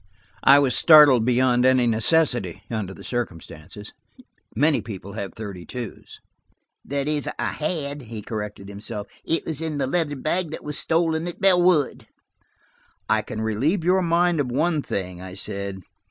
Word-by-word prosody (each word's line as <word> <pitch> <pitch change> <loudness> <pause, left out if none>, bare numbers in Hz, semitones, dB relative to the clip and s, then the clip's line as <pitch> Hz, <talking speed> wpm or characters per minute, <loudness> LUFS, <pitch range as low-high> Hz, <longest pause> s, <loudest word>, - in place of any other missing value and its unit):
I 140 - +8
was 140 -3 +2
startled 145 -8 +7
beyond 125 0 +3
any 130 -1 +4
necessity, 120 - +1
under 110 -4 -3
the - - -11
circumstances. 100 -4 -6 0.6
Many 145 +5 +3
people 100 -2 -8
have 100 -3 -6
thirty 100 -5 -7
twos. 120 +1 -8 0.6
"That 140 0 -3
is, 150 -1 -1
I - - -1
had," 150 -2 -3
he 110 -3 -8
corrected 105 -2 -6
himself. 100 +1 -6 0.2
"It 165 - -1
was 160 -1 -2
in 160 -2 -3
the 135 - 0
leather 150 +1 0
bag 155 +5 -1
that 160 - -7
was 150 -1 -1
stolen 165 0 +1
at 175 - -7
Bellwood." 180 -6 +3 1.0
"I - - +3
can 110 - -6
relieve 130 - 0
your 185 +2 +3
mind 170 -1 +2
of 130 -4 -1
one 155 +4 +1
thing," 90 -7 -5
I 95 0 -9
said. 100 -1 -4
130 Hz, 155 wpm, -23 LUFS, 105-160 Hz, 1.0 s, I